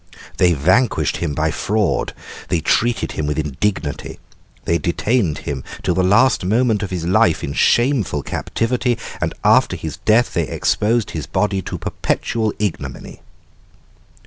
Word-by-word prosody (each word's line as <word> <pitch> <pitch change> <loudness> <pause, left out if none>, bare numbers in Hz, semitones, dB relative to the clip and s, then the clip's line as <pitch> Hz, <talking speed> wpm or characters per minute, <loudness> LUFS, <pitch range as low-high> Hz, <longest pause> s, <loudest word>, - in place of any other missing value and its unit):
They 90 -1 +4
vanquished 90 - +2
him 80 -4 -3
by - - +1
fraud, 105 -3 -1 0.3
they 85 - +1
treated 115 +8 +1
him 75 - -3
with 75 - -1
indignity. 75 +1 -2 0.5
They 85 0 +1
detained 90 - 0
him 65 -3 -4 0.2
till - - +1
the 95 - +1
last 105 +8 +4
moment 110 +2 +2
of 100 - -3
his 90 -3 -3
life 95 -1 +3
in 70 - -3
shameful 120 - +2
captivity, 120 +1 -1 0.2
and - - 0
after - - +4
his - - -6
death 115 +3 +2
they 85 -4 0
exposed 110 - 0
his 80 - -5
body 100 0 0
to - - -5
perpetual 110 -2 -1
ignominy." 105 -5 -4
95 Hz, 145 wpm, -19 LUFS, 85-115 Hz, 0.5 s, They